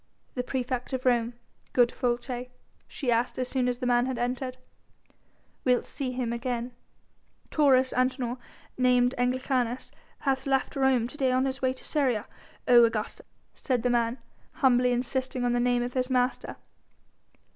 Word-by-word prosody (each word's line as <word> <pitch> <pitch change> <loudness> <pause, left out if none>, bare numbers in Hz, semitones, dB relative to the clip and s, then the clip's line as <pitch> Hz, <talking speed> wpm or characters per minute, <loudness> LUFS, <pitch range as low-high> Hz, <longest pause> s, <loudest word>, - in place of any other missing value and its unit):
"The 250 - -1
praefect 255 0 -3
of 260 0 -3
Rome, 240 -1 +2 0.4
good 245 -1 +5
Folces?" 245 0 -2 0.4
she 255 -5 -2
asked 235 +1 +1
as 255 -1 -1
soon 255 -2 +1
as 245 -1 0
the 250 - -4
man 245 0 +3
had 260 -2 -2
entered, 250 +1 -2 1.1
"wilt 250 -1 +2
see 270 -3 -3
him 245 -2 -2
again?" 240 0 -3 0.8
"Taurus 265 -4 +4
Antinor 255 -1 0 0.4
named 250 0 +4
Anglicanus 250 0 0 0.3
hath 265 -1 0
left 270 +2 0
Rome 265 -4 +2
to 275 - -12
day 265 -3 +2
on 255 +1 +2
his 265 0 -3
way 260 -1 +2
to 260 - -12
Syria, 255 -8 0 0.4
O 240 -1 +8
Augusta!" 225 -2 -1 0.3
said 250 -4 -1
the 245 - +2
man, 235 0 +1 0.4
humbly 250 -3 +3
insisting 255 +1 -1
on 240 - +2
the 245 - +1
name 245 0 +2
of 245 +1 -4
his 255 0 0
master. 250 0 0
250 Hz, 155 wpm, -28 LUFS, 245-260 Hz, 1.1 s, O